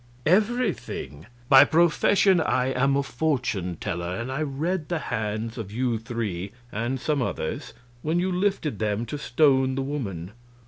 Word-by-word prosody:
Everything. 195 Hz, -, 0 dB, 0.2 s
By 135 Hz, +1 st, +9 dB
profession 175 Hz, +4 st, +4 dB
I 130 Hz, -4 st, +1 dB
am 135 Hz, +2 st, +2 dB
a 140 Hz, -, +1 dB
fortune 120 Hz, -, -1 dB
teller, 85 Hz, 0 st, -3 dB
and 120 Hz, +6 st, -4 dB
I 135 Hz, +3 st, -2 dB
read 155 Hz, +4 st, -2 dB
the 175 Hz, -, 0 dB
hands 110 Hz, -3 st, -3 dB
of 105 Hz, -3 st, -6 dB
you 120 Hz, 0 st, 0 dB
three 105 Hz, -5 st, -4 dB, 0.2 s
and 120 Hz, +5 st, -2 dB
some 150 Hz, +1 st, 0 dB
others 80 Hz, -9 st, -3 dB, 0.3 s
when 160 Hz, +5 st, 0 dB
you 185 Hz, +1 st, 0 dB
lifted 180 Hz, -, 0 dB
them 110 Hz, +1 st, -1 dB
to 145 Hz, +6 st, -5 dB
stone 135 Hz, -1 st, +3 dB
the 135 Hz, -, -1 dB
woman. 100 Hz, -, -4 dB
130 Hz, 150 wpm, -25 LUFS, 110-155 Hz, 0.3 s, By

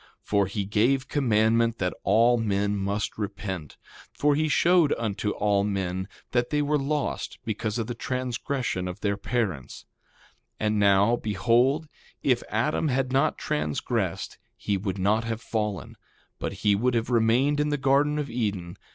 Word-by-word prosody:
For 100 Hz, -2 st, +1 dB
he 100 Hz, +1 st, -3 dB
gave 120 Hz, +7 st, +1 dB
commandment 115 Hz, -3 st, +2 dB
that 90 Hz, -1 st, -1 dB
all 120 Hz, +2 st, +4 dB
men 100 Hz, -1 st, 0 dB
must 100 Hz, +2 st, -2 dB
repent; 95 Hz, -6 st, -5 dB, 0.3 s
for 145 Hz, 0 st, +2 dB
he 155 Hz, +2 st, +1 dB
showed 170 Hz, +1 st, +4 dB
unto 105 Hz, -2 st, -2 dB
all 100 Hz, -1 st, +1 dB
men 95 Hz, -2 st, -2 dB, 0.2 s
that 120 Hz, 0 st, +1 dB
they 150 Hz, -1 st, +1 dB
were 150 Hz, +1 st, +1 dB
lost, 145 Hz, +1 st, -2 dB
because 110 Hz, 0 st, -2 dB
of 115 Hz, -, -1 dB
the 120 Hz, -, -4 dB
transgression 125 Hz, -4 st, -2 dB
of 90 Hz, -, -7 dB
their 100 Hz, -1 st, 0 dB
parents. 100 Hz, -, -3 dB, 0.7 s
2:22 110 Hz, -, 0 dB
And 105 Hz, 0 st, +1 dB
now, 100 Hz, +3 st, +4 dB
behold, 120 Hz, -, +2 dB, 0.4 s
if 125 Hz, -3 st, +2 dB
Adam 125 Hz, +9 st, 0 dB
had 130 Hz, -1 st, 0 dB
not 135 Hz, +4 st, +2 dB
transgressed 75 Hz, 0 st, -2 dB, 0.2 s
he 100 Hz, -, -1 dB
would 95 Hz, 0 st, -3 dB
not 105 Hz, +4 st, +2 dB
have 115 Hz, -1 st, -3 dB
fallen, 105 Hz, -4 st, -3 dB, 0.4 s
but -, -, -3 dB
he 105 Hz, -, +5 dB
would 120 Hz, +5 st, +1 dB
have 115 Hz, +1 st, -1 dB
remained 120 Hz, +5 st, +3 dB
in 150 Hz, 0 st, +1 dB
the 145 Hz, -, 0 dB
garden 140 Hz, +2 st, +2 dB
of 150 Hz, -1 st, -2 dB
Eden. 100 Hz, -8 st, -3 dB
115 Hz, 160 wpm, -26 LUFS, 100-130 Hz, 0.7 s, he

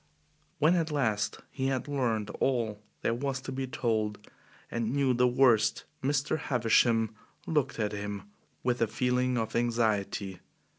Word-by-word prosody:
When 155 Hz, +4 st, +4 dB
at 165 Hz, -2 st, +1 dB
last 110 Hz, -8 st, 0 dB
he 135 Hz, -1 st, -1 dB
had 135 Hz, 0 st, -1 dB
learned 115 Hz, -7 st, 0 dB
all 115 Hz, -5 st, 0 dB, 0.2 s
there -, -, +2 dB
was 135 Hz, +2 st, -2 dB
to 130 Hz, -, -6 dB
be 130 Hz, 0 st, -3 dB
told, 110 Hz, -4 st, 0 dB, 0.5 s
and 115 Hz, -1 st, -1 dB
knew 135 Hz, -1 st, +2 dB
the 125 Hz, +1 st, +4 dB
worst, 120 Hz, -4 st, +4 dB, 0.2 s
Mr. 145 Hz, +3 st, +1 dB
Havisham 115 Hz, -2 st, +3 dB, 0.3 s
looked 150 Hz, -5 st, 0 dB
at 105 Hz, -2 st, 0 dB
him 105 Hz, -1 st, -4 dB, 0.4 s
with 125 Hz, -1 st, 0 dB
a 115 Hz, -, +4 dB
feeling 125 Hz, +2 st, +1 dB
of 115 Hz, -1 st, -2 dB
anxiety. 110 Hz, -5 st, 0 dB
120 Hz, 145 wpm, -30 LUFS, 110-135 Hz, 0.5 s, When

